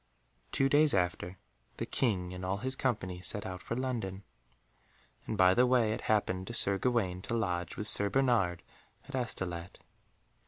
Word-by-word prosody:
Two 135 - +2
days 145 0 +4
after 90 0 -1 0.4
the - - -2
King 90 -8 0
and 90 0 -7
all 95 +1 -1
his 130 +5 -3
company 95 -10 -2
set 105 +3 -1
out 90 -2 -6
for 115 - -4
London, 115 -7 -3 1.0
and 110 - -2
by 95 -1 +6
the 125 +4 +4
way, 120 -4 +3
it 110 - -3
happened 95 -3 0
to - - -5
Sir 100 -4 +3
Gawaine 95 -7 0
to 115 +4 -2
lodge 90 -6 -2
with 105 - -2
Sir 100 -2 +3
Bernard 115 -9 +2 0.4
at 140 - -11
Astolat. 95 -9 -3
100 Hz, 165 wpm, -32 LUFS, 90-125 Hz, 1.0 s, by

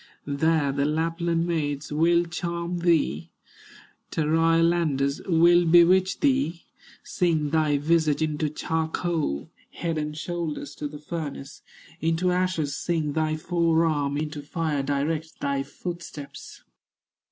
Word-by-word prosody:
There 145 0 +1
the 140 +1 0
Lapland 165 +2 0
maids 150 -4 -2
will 170 +3 +3
charm 170 0 -3
thee, 155 - +1 0.8
Turyalanders 165 -3 +2
will 175 0 +5
bewitch 180 +3 +5
thee, 265 - +1 0.4
Sing 160 -5 0
thy 155 -2 +2
visage 155 0 +2
into 155 0 -1
charcoal, 160 - -2 0.2
Head 165 -2 -3
and 150 0 -4
shoulders 160 -4 -4
to 150 - -3
the 150 +1 -9
furnace, 150 -3 -6 0.4
Into 165 +3 +1
ashes 180 -6 0
sing 160 -2 -1
thy 155 0 0
fore 165 0 +2
arm, 145 -3 0
Into 150 0 -4
fire 150 -1 -2
direct 150 +3 -2
thy 140 -1 -1
footsteps." 165 -2 -8
160 Hz, 115 wpm, -25 LUFS, 150-170 Hz, 0.8 s, will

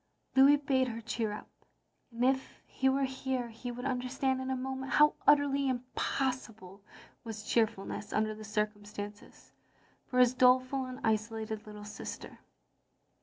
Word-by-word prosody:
..." - - -42
Lotiis 280 +2 +6
bade 260 -2 +3
her 230 -2 -4
cheer 225 -1 -2
up; 210 - -7 0.6
and 235 +1 0
if 265 0 0
he 265 - +1
were 275 +1 +2
here, 265 -2 -2
he 230 +2 -7
would 245 +2 -6
understand 260 0 -1
in 260 - -4
a 265 - 0
moment 265 +1 -4
how 300 0 +6
utterly 280 -1 +4
impossible 245 -5 -3 0.4
was 220 -2 -6
cheerfulness 215 -2 0
under 215 0 +1
the 215 0 -10
circum 210 0 -2
stances, 205 0 -9 0.6
for 250 - -3
his 250 -1 +6
doleful 255 +1 +4
and 255 0 -7
isolated 220 0 -1
little 210 -1 -9
sister. 210 - -8
250 Hz, 150 wpm, -32 LUFS, 215-265 Hz, 0.6 s, Lotiis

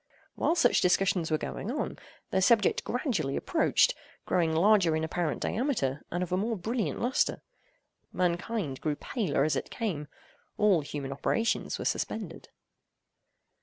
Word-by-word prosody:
While 335 - +1
such - - +4
discussions 180 -2 +2
were 155 - +2
going 195 - -5
on, 285 +4 -3 0.3
their 190 - +2
subject 215 0 +3
gradually 215 - -1
approached, - - +2 0.3
growing 165 -3 +1
larger 175 0 +4
in 160 - -1
apparent 160 -1 -2
diameter, 205 - -1
and 175 +1 -1
of 175 - -6
a 180 - +2
more 225 +4 0
brilliant 210 - -2
lustre. 250 +3 0 0.7
Mankind 175 - -1
grew 150 -2 0
paler 175 - -1
as 150 -1 +1
it - - -3
came. 175 -11 -3 0.5
All 205 -6 +4
human 140 -1 -5
operations 225 +11 0
were - - -5
suspended. - - -3
180 Hz, 140 wpm, -29 LUFS, 155-220 Hz, 0.7 s, such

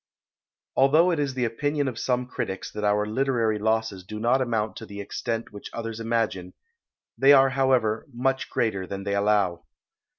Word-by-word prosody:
Although 155 +7 +5
it 165 - 0
is 140 -3 -1
the 125 -2 0
opinion 145 +5 -1
of 125 -3 -4
some 125 -1 0
critics 95 -6 -5
that 105 - -5
our 105 0 +2
literary 115 -2 0
losses 110 -3 -1
do 105 +4 -7
not 120 +4 +2
amount 110 -4 -1
to 110 - -8
the 100 0 -8
extent 115 +3 -4
which 105 - -8
others 115 -1 -5
imagine, 115 -6 -2 0.6
they 135 +1 +7
are 135 -1 +6
however 130 -4 +1
much 135 +2 -1
greater 100 -5 -1
than 100 +1 -5
they 100 0 -2
allow. 100 -4 +1
115 Hz, 170 wpm, -25 LUFS, 105-130 Hz, 0.6 s, they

